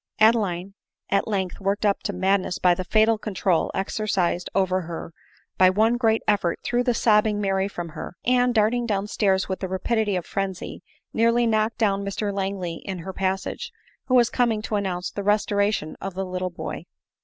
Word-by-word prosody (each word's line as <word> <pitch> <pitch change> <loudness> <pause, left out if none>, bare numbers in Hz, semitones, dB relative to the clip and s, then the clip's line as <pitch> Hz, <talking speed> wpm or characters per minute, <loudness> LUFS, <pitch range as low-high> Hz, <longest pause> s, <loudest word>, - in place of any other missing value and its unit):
Adeline, 200 -4 +2 0.4
at 195 - +2
length 190 -4 -2
worked 200 +2 -1
up 200 -1 +2
to 205 - -2
madness 190 -1 0
by 180 -1 +4
the 185 - -3
fatal 220 +3 +3
control 190 -5 0
exercised 190 -3 -1
over 185 -1 +2
her, 165 -1 -7 0.5
by 185 0 +7
one 220 +5 +3
great 225 -2 +2
effort 200 -5 +2
threw 240 0 +1
the 245 -2 +1
sobbing 210 -1 +3
Mary 195 -1 +1
from 175 -4 -6
her, 160 - -8
ana, 250 0 +3
darting 235 +2 +2
down 200 -2 0
stairs 195 -2 +1
with 190 - -3
the 190 - -3
rapidity 210 +2 0
of 180 - -2
frenzy, 195 -2 -4 0.3
nearly 230 +1 +3
knocked 220 0 +1
down 200 -4 +1
Mr 200 +1 -2
Langley 190 -4 -3
in 190 -2 -6
her 185 +3 -7
passage, 195 - -2 0.4
who 255 - +2
was 240 -2 +4
coming 230 -4 +1
to 220 - -2
announce 185 -3 -2
the 200 - -4
restoration 205 -4 +1
of 195 -2 -5
the 190 0 -2
little 185 0 -3
boy. 170 - -7
200 Hz, 180 wpm, -24 LUFS, 185-220 Hz, 0.5 s, by